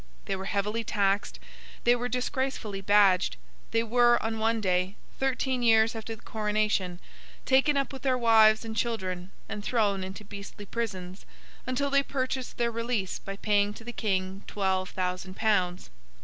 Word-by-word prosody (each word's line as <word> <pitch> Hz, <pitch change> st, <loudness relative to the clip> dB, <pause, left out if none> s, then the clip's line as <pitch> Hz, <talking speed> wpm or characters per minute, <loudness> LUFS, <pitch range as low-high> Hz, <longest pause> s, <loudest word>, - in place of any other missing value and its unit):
They -, -, -1 dB
were 190 Hz, 0 st, -6 dB
heavily 210 Hz, +3 st, -1 dB
taxed; 200 Hz, -2 st, 0 dB, 0.5 s
they 240 Hz, +1 st, +5 dB
were 245 Hz, 0 st, -3 dB
disgracefully 250 Hz, -5 st, -2 dB
badged; 195 Hz, -, +4 dB, 0.3 s
they 230 Hz, -, +1 dB
were, 240 Hz, +1 st, +4 dB
on 225 Hz, 0 st, -2 dB
one 225 Hz, +1 st, +2 dB
day, 185 Hz, -1 st, 0 dB, 0.2 s
thirteen 260 Hz, -1 st, 0 dB
years 225 Hz, -1 st, +5 dB
after 225 Hz, 0 st, -5 dB
the 215 Hz, -, -20 dB
coronation, 210 Hz, -4 st, 0 dB, 0.5 s
taken 270 Hz, +2 st, +4 dB
up 275 Hz, 0 st, -1 dB
with 265 Hz, -, -7 dB
their 260 Hz, -2 st, +2 dB
wives 220 Hz, -2 st, +5 dB
and 220 Hz, -1 st, -5 dB
children 185 Hz, -6 st, -2 dB, 0.2 s
and 210 Hz, -, -5 dB
thrown 205 Hz, -5 st, +1 dB
into 190 Hz, +3 st, -7 dB
beastly 200 Hz, +1 st, -9 dB
prisons, 190 Hz, -5 st, -5 dB, 0.4 s
until 275 Hz, +2 st, 0 dB
they 280 Hz, 0 st, +5 dB
purchased 260 Hz, -2 st, -3 dB
their 235 Hz, -1 st, +1 dB
release 230 Hz, -4 st, -2 dB
by 195 Hz, -, -6 dB
paying 205 Hz, 0 st, +1 dB
to -, -, -11 dB
the 240 Hz, +1 st, -7 dB
King 190 Hz, -2 st, -2 dB
twelve 190 Hz, -2 st, 0 dB
thousand 185 Hz, 0 st, -3 dB
pounds. 185 Hz, -, 0 dB
215 Hz, 160 wpm, -28 LUFS, 195-240 Hz, 0.5 s, they